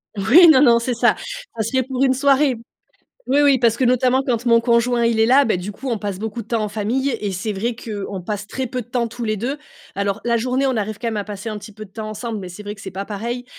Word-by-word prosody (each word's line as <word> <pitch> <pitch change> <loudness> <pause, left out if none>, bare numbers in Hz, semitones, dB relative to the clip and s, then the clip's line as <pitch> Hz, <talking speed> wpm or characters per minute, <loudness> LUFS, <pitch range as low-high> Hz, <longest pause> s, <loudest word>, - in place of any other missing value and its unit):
Oui, 235 - +7
non, 265 - +5
non, 235 -4 +6
c'est 245 +2 -2
ça, - - +3 0.4
ça 225 - -1
serait 260 +4 0
pour 260 +1 -2
une 265 -1 +4
soirée. 275 0 +3 0.7
Oui, 275 - +3
oui, 280 -2 +5
parce 230 -2 +2
que 260 - -2
notamment 255 +1 +3
quand 245 -2 -1
mon 230 -1 +5
conjoint, 235 0 +2
il 230 -1 +1
est 220 - +4
là, 270 +4 +5
bah, 220 -6 +1
du 185 +4 -6
coup, 265 +6 -7
on 230 - -1
passe 200 -2 -5
beaucoup 225 +1 -4
de - - -20
temps 225 -1 -1
en 210 - -2
famille 225 +6 -1
et 205 -2 -2
c'est 190 +4 -3
vrai 225 +5 -2
qu'on 205 -4 -6
passe 210 +2 -4
très 260 +3 -4
peu 250 +1 -3
de - - -21
temps 240 -1 -1
tous 235 +1 -6
les 215 -1 -1
2. 255 +8 -3 0.4
Alors 200 +1 -1
la 235 -1 +2
journée, 255 +3 0
on 260 -2 0
arrive 215 -1 -3
quand 235 - -2
même 220 - -3
à 205 - -2
passer 210 +1 -7
un 215 -1 -4
petit 210 +1 -11
peu 215 +1 -9
de 195 - -17
temps 215 +1 -6
ensemble 220 +1 -5
mais 185 -2 -7
c'est 180 +4 -10
vrai 205 +1 -6
que - - -14
c'est 190 -1 -8
pas 195 +2 -4
pareil, 235 +4 -5
230 Hz, 285 wpm, -20 LUFS, 210-250 Hz, 0.7 s, Oui